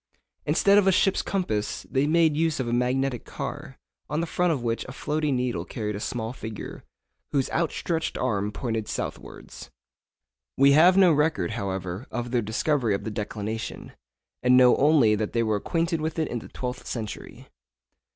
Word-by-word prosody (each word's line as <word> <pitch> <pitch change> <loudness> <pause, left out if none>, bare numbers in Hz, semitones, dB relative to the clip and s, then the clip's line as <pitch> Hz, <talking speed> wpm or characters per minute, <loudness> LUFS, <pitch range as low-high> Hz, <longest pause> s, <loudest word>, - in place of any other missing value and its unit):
Instead 200 +1 +5
of 195 - +1
a - - +6
ship's 190 +1 +2
compass, 110 - -2
they 135 +2 0
made 160 -1 +3
use 160 -1 +1
of 130 - -1
a 120 - -1
magnetic 125 0 0
car, - - -7 0.3
on 150 +2 -1
the 170 - 0
front 175 +2 +1
of 135 -7 -2
which 115 -1 -1
a - - -8
floating 150 +1 -1
needle 125 -1 -1
carried 105 -4 -4
a - - -4
small 115 +1 -3
figure, 110 -4 -8 0.5
whose 135 -3 0
outstretched 165 0 -1
arm 105 -5 -1
pointed 110 -2 -3
southwards. - - -7 0.9
We 140 +1 +6
have 175 +6 +6
no 185 -4 +6
record, 150 - +1
however, 95 -1 -4
of 120 0 -4
their 120 -2 +2
discovery 115 +1 0
of - - -5
the 110 - -4
declination, 105 +1 -5 0.5
and 125 0 +5
know 125 -1 +7
only 140 -7 +5
that 105 0 -2
they 115 - +2
were 110 -2 +1
acquainted 165 - -1
with 160 +1 -3
it 160 - 0
in 120 - -3
the - - -11
twelfth 125 0 -6
century. 110 -3 -6
125 Hz, 175 wpm, -26 LUFS, 110-155 Hz, 0.9 s, know